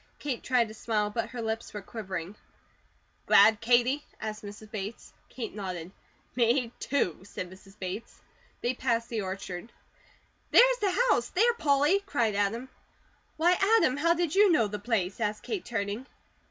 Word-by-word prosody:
Kate 275 -5 -3
tried 250 -3 +2
to 215 - -10
smile, 215 -1 -1
but 230 +1 -2
her 235 -1 -5
lips 220 0 -3
were 210 - -4
quivering. 190 -4 -6 0.9
"Glad, 220 -1 +6
Katie?" 245 +4 +3 0.2
asked 215 0 -5
Mrs. 210 +1 -10
Bates. 210 +1 -6 0.2
Kate 235 -4 -6
nodded. 185 -4 -5 0.4
"Me, 240 0 +2
too!" 230 - 0
said 185 -2 -7
Mrs. 195 +2 -16
Bates. 190 +3 -6 0.4
They 245 - 0
passed 235 -2 -1
the 225 -3 -2
orchard. 190 +2 -6 0.8
"There's - - +6
the 405 - +3 0.2
house, 240 - +1
there, 470 +6 +3
Polly!" 295 -1 +3
cried 230 - +1
Adam. 205 +5 -1 0.7
"Why, 340 +3 +4 0.2
Adam, 260 - +3
how 335 +3 +3
did 340 -2 -1
you 400 -1 +6
know 270 -9 +4
the 210 0 -4
place?" 205 -4 -1
asked 210 0 -2
Kate, 410 -5 -4
turning. 225 +2 -3
225 Hz, 155 wpm, -29 LUFS, 205-260 Hz, 0.9 s, Glad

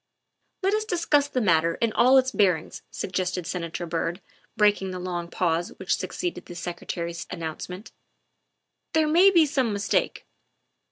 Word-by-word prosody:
" - - -49
Let 390 +2 +2
us 430 0 +1
discuss 335 -8 +1
the 260 - -1
matter 165 -4 +3
in 230 -2 0
all 255 +2 +5
its 260 0 +3
bearings," 180 - +1
sug - - -5
gested 180 -1 -2
Senator 175 -1 -4
Byrd, 170 +2 -2 0.4
breaking 205 -3 +3
the 185 - -5
long 175 -1 -4
pause 170 -1 -1
which - - 0
succeeded 355 -1 -4
the 175 - -9
Secretary's 170 -1 -5
announcement; 180 +4 -6 0.5
" - - -54
there 315 -1 +4
may 345 +6 +6
be 340 -5 +5
some 265 -5 0
mistake." 200 0 -1
185 Hz, 160 wpm, -25 LUFS, 170-270 Hz, 0.5 s, may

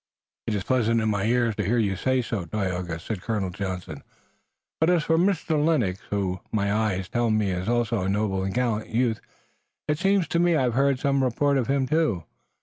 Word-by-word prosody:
"It 110 - 0
is 100 - -2
pleasant 115 -1 +2
in 110 -1 0
my 100 -1 -1
ears 120 -1 +2
to 105 - 0
hear 110 +6 +1
you 100 -4 +1
say 130 +5 +1
so, 110 -6 -3
Tayoga," 90 -3 -3
said 95 +2 -5
Colonel 105 -4 -2
Johnson, 95 -1 -5 0.8
"and 160 - +4
as 175 -3 +3
for 160 - +2
Mr. 165 -4 +1
Lennox, 120 - +1
who, 95 -3 -1
my 100 -2 0
eyes 105 -4 0
tell 120 +1 0
me 110 -3 +1
is 90 +3 -2
also 120 -3 +1
a 95 - -1
noble 100 -1 0
and 95 - -2
gallant 115 -4 0
youth, 115 -1 0 0.7
it 150 0 0
seems 195 -3 +2
to 170 - +1
me 175 -1 +3
I've 130 -5 +1
heard 135 +1 +2
some 140 -1 +1
report 140 +3 +1
of 125 - -1
him 135 -1 +1
too. 150 - +1
115 Hz, 205 wpm, -25 LUFS, 100-135 Hz, 0.8 s, and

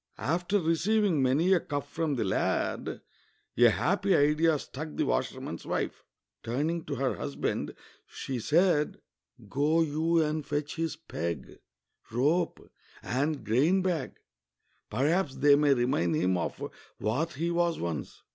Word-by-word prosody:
After 175 +7 0
receiving 180 +1 +2
many 145 +9 +3
a 185 - +4
cuff 145 -3 -4
from 155 0 -1
the 120 - 0
lad, 95 - -1 0.5
a 120 0 +7
happy 195 - +2
idea 150 +2 +3
struck 150 +2 -7
the - - +1
washerman's - - -2
wife: - - -3 0.4
turning 150 +8 -2
to 145 - -3
her 135 0 -1
husband 140 -1 -3 0.3
she 130 -2 -5
said, 155 - +2 0.2
" - - -62
Go 150 +9 +2
you 160 +2 +1
and 155 0 -1
fetch 145 +1 -3
his 165 -1 -1
peg, 85 - -5 0.5
rope, 150 +10 0 0.3
and 140 0 -1
grain 150 - +3
bag; 170 -7 -1 0.7
perhaps 145 - +1
they 145 0 +6
may 145 -1 +4
remind 120 -10 +1
him 90 +4 +2
of 85 - -3 0.3
what 145 +11 -1
he 165 +5 -1
was 170 -1 +1
once." 80 -6 -5
150 Hz, 135 wpm, -29 LUFS, 130-165 Hz, 0.7 s, a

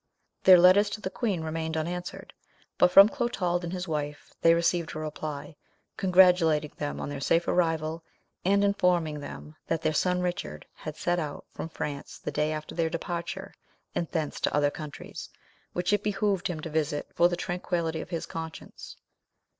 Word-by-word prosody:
Their 185 -1 +10
letters 185 +4 +6
to 205 - -5
the 190 - -4
queen 200 -9 -1
remained 160 0 -3
unanswered, 175 +3 -4 0.5
but 180 - +6
from 195 +3 +9
Clotald 210 -9 -1
and 170 - -4
his 180 0 -4
wife 150 -2 -4
they 165 0 +6
received 170 -1 0
a - - -3
reply, 155 0 -5 0.4
congratulating 180 -5 +4
them 145 -1 -4
on - - -4
their 145 -1 -5
safe 165 +4 +2
arrival, 165 -2 0 0.4
and 200 +2 +3
informing 180 -6 +2
them 150 +1 -9
that 165 -1 -1
their 155 - +1
son 180 +3 +1
Richard 75 - -3
had 155 -1 -8
set 175 +1 0
out 150 -3 -5
from 160 - -6
France 145 -3 -5
the - - -5
day 150 +1 0
after 155 0 -5
their 165 -1 0
departure, 170 +1 -4 0.4
and 170 - -2
thence 155 -4 -2
to - - 0
other 145 -1 +3
countries, 150 -2 -8 0.4
which 180 +3 0
it 205 - +2
behoved 205 -2 0
him 165 -4 -4
to 165 - -5
visit 150 -1 -1
for 170 - +5
the 175 - -2
tranquillity 175 -2 -2
of - - -9
his 170 -2 -3
conscience. 160 -1 -8
170 Hz, 175 wpm, -28 LUFS, 155-180 Hz, 0.5 s, Their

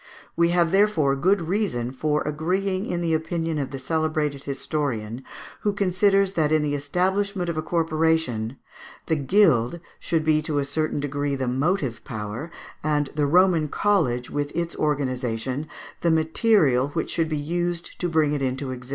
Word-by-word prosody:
We 170 0 +3
have, 170 -1 +2
therefore, 190 -9 +3
good 185 +7 +2
reason 165 - -1
for 150 +3 0
agreeing 185 +6 -1
in 175 -1 -2
the 165 -1 0
opinion 160 0 -1
of 140 - -2
the 135 - -5
celebrated 150 0 -1
historian, 135 -4 -3 0.4
who 205 - 0
considers 195 0 +2
that 155 -4 +1
in 155 -1 +3
the 145 -1 -1
establishment 180 +6 0
of 170 - -2
a 155 - -1
corporation 160 -8 0 0.5
"the 160 - +1
guild 150 - +3 0.2
should 160 -2 -1
be 155 -1 +3
to 155 -1 -2
a 140 - +1
certain 155 +1 -1
degree 145 0 -1
the 130 -1 -2
motive 135 - 0
power, 110 +7 -5 0.3
and 150 -2 0
the 145 -1 +1
Roman 175 -1 +4
college, 145 -11 +1
with 145 0 -2
its 170 0 -2
organization, 130 -2 -1 0.3
the 170 - +2
material 160 - +3
which 160 +3 -3
should 165 -2 0
be 155 - -1
used 175 +3 -3
to 175 - -1
bring 155 -3 +2
it 145 - -1
into 130 0 -2
existence." 125 0 -8
155 Hz, 165 wpm, -24 LUFS, 140-175 Hz, 0.5 s, Roman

